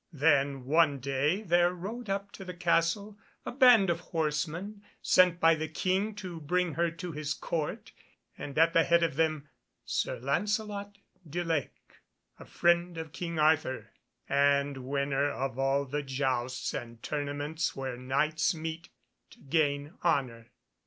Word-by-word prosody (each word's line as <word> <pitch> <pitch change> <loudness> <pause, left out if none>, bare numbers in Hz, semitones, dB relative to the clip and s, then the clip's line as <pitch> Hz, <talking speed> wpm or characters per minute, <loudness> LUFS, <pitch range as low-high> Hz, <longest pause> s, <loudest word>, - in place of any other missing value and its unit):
Then 140 -3 +2
one 155 0 +3
day 140 - 0
there 175 -2 +3
rode 215 +6 -6
up 200 +1 -2
to 195 - -9
the 180 -2 -7
Castle 175 +4 0 0.3
a - - -3
band 245 -8 +6
of 170 - -2
horsemen 165 +5 -3 0.2
sent 180 -2 +4
by 165 -1 +6
the 155 0 -2
King 190 +6 -1
to 180 -5 -7
bring 180 +2 0
her 170 +3 +1
to 170 +1 -7
his 150 0 -3
Court, 155 -3 -4 0.4
and 140 - -7
at 165 +1 +5
the 165 - +5
head 170 0 +3
of 165 -5 0
them 155 -1 0 0.4
Sir - - -1
Lancelot 205 - -2 0.3
du 175 +4 -2
Lake, 165 -4 -4 0.4
friend 175 0 +1
of 160 -2 -6
King 170 -2 -4
Arthur, 155 -3 +1 0.4
and 140 -1 +2
winner 140 0 0
of 135 -2 -4
all 135 +1 +1
the 145 +2 -3
jousts 130 -2 -2
and 115 -1 -7
tournaments 145 +2 -2
where 130 -2 -4
Knights 140 +7 0
meet 160 +1 -6 0.4
to - - -17
gain 145 0 0
honour. 125 -9 0
160 Hz, 145 wpm, -30 LUFS, 140-175 Hz, 0.4 s, band